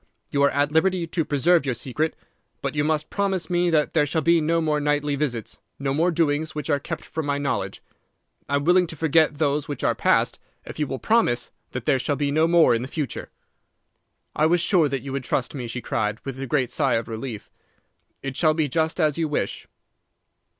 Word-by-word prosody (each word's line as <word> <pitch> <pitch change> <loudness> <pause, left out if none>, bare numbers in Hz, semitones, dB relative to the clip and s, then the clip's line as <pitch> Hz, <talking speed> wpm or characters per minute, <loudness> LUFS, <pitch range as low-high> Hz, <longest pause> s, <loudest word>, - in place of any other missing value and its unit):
You 140 - +1
are 140 - +5
at 145 +1 +1
liberty 175 +2 +2
to 165 0 -1
preserve 155 +4 +3
your 130 -3 -1
secret, 150 +7 -2 0.5
but - - -2
you 145 -1 0
must 155 0 -1
promise 195 -3 -1
me 175 0 +2
that 155 -3 +1
there 150 -3 +3
shall 160 +2 -1
be 170 +2 +4
no 165 +2 +1
more 155 -2 +1
nightly 145 0 0
visits, 125 -6 -3 0.2
no 135 -1 -1
more 165 +5 +2
doings 155 -2 0
which 150 +1 -3
are 145 - +2
kept 165 +3 -6
from 160 -2 -4
my 140 0 0
knowledge. 140 -1 -3 0.7
I 140 - +1
am 140 - 0
willing 180 +1 +4
to 160 - -7
forget 160 0 +2
those 145 -1 0
which 145 -3 -5
are - - +3
passed - - +1 0.3
if - - -9
you 150 - 0
will 135 - -3
promise 175 - +1 0.2
that 125 -2 -5
there 135 -3 +3
shall 145 +3 -1
be 145 0 -1
no 155 +2 +3
more 170 -4 +5
in 115 - 0
the 130 - -4
future.' 145 -1 -4 1.1
"'I 155 - +3
was 175 +2 +3
sure 170 -4 +3
that 135 -1 -3
you 140 - -6
would 135 -1 -3
trust 125 0 -1
me,' 125 -5 -5
she 125 +2 -5
cried, 105 -3 -1
with 135 -1 -5
a 135 - -4
great 130 -2 0
sigh 135 0 +1
of 115 - -2
relief. 115 -1 -6 0.7
'It 135 -1 -4
shall 155 0 +3
be 155 -2 +1
just 160 +4 0
as 155 -1 +2
you 160 - +1
wish. 150 - -3
150 Hz, 220 wpm, -24 LUFS, 135-160 Hz, 1.1 s, are